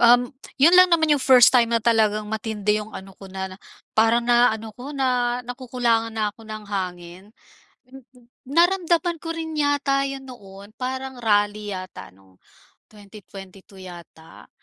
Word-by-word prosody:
um, 245 +2 +4 0.2
'yon 305 +6 +5
lang 365 - +7
naman 320 -3 +2
yung 290 - +1
1st 255 -3 +6
time 240 -3 +4
na 230 -1 0
talagang 215 -2 +2
matindi 215 -1 -2
yung 215 +1 -10
ano 190 0 -9
ko 195 - -11
na 190 0 -6 0.4
parang 225 +2 +2
na 240 0 +4
ano 220 0 -8
ko 265 +6 -9
na 250 -2 0
nakukulangan 240 -2 -2
na 215 -2 -1
ako 225 +1 -17
ng 215 -1 -8
hangin. 185 -2 -6 1.2
Naramdaman 345 +2 +1
ko 330 +1 -6
rin 320 -1 -5
yata 285 -1 +1
'yan 275 0 -6
noon 200 -3 -13
parang 260 0 -5
rally 205 -2 0
yata 185 - -9
nung 95 -1 -25 0.5
2022 195 -2 -14
yata. 170 -2 -14
230 Hz, 150 wpm, -22 LUFS, 205-265 Hz, 1.2 s, lang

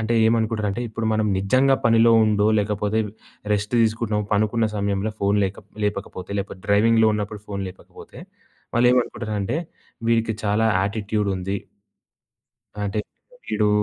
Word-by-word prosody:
అంటే 110 +1 0
ఏమనుకుంటారంటే, 110 -1 0
ఇప్పుడు 110 +1 -3
మనం 110 0 +1
నిజంగా 130 +8 +3
పనిలో 115 0 +5
ఉండో 105 -1 +2
లేకపోతే 105 +1 0 0.5
రెస్ట్ 105 +1 -1
తీసుకుంటున్నామో, 110 -2 0
పనుకున్న 110 +2 +2
సమయంలో 100 +1 -1
ఫోను 100 +1 +2
లేకప్ 95 +1 -6
లేపకపోతే, 100 -2 -4
లేకపోతే 95 -1 -6
డ్రైవింగ్‌లో 110 +2 +4
ఉన్నప్పుడు 105 0 -4
ఫోను 100 -1 -4
లేపకపోతే, 90 - -14 0.5
వాళ్ళేమనుకుంటారంటే, 120 -2 +1 0.5
వీడికి 115 -1 +2
చాలా 105 +2 +2
యాటిట్యూడుంది. 100 -1 -1 1.3
అంటే 100 +1 -2 0.5
వీడు 105 0 +1
105 Hz, 115 wpm, -23 LUFS, 100-115 Hz, 1.3 s, పనిలో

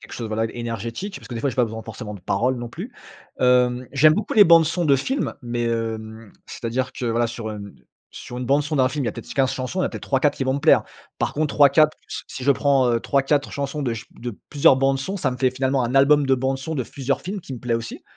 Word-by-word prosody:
quelque - - -14
chose, 115 - -5
voilà 110 +1 -1
énergétique, 120 - -5
parce - - -12
que, 125 - -6
des 115 - -4
fois, 140 - 0
j'ai - - -3
pas 125 - +3
besoin 110 0 -6
forcément 105 -3 -8
de 100 - -11
parole 125 +8 0
non 120 -1 -5
plus. 200 - -8 0.5
Hem, 125 0 +3
j'aime 155 +3 +5
beaucoup 210 +4 -3
les 210 - +9
bandes-son 170 0 +5
de 140 -3 +4
films 265 - -2
mais, 120 0 -3
hem, 110 -1 -4
c'est-à-dire 130 +3 -3
que 125 - -4
voilà, 115 +1 +1
sur 110 -2 -6 0.6
sur 125 - -8
une 125 - -4
bande-son 145 +3 +1
d'un 130 -2 +3
film, 140 +1 -3
il - - -2
y - - +2
a - - -3
peut-être - - -9
15 135 -1 +1
chansons, 130 +7 -4
il - - +2
y - - +2
en - - +2
a - - -2
peut-être - - -8
3-4 140 +1 +1
qui - - -2
vont 130 0 0
me - - -1
plaire. - - +5 0.4
Par - - -1
contre 150 -1 -1
3-4 150 +2 +5
s - - -5
si 130 - -8
je 140 - +3
prends, 135 -2 +3
heu, 115 - +2
3-4 140 +2 0
chansons 140 +1 -3
de 120 -4 -1
ch 110 - -7
de 120 -3 -6
plusieurs 140 -2 +5
bandes 135 0 +1
sons, 190 +9 -4
ça 145 -9 0
me 125 - -5
fait, 130 -1 +1
finalement, 130 0 0
un 120 +2 -3
album 140 +1 +5
de 135 - +4
bandes 130 +1 -1
sons 160 +4 -5
de 130 - -1
plusieurs 135 +3 -3
films, 195 +3 -5
qui 135 - -8
me 120 - -9
plaît 120 -2 -1
aussi. 115 0 -5
130 Hz, 270 wpm, -22 LUFS, 120-145 Hz, 0.6 s, les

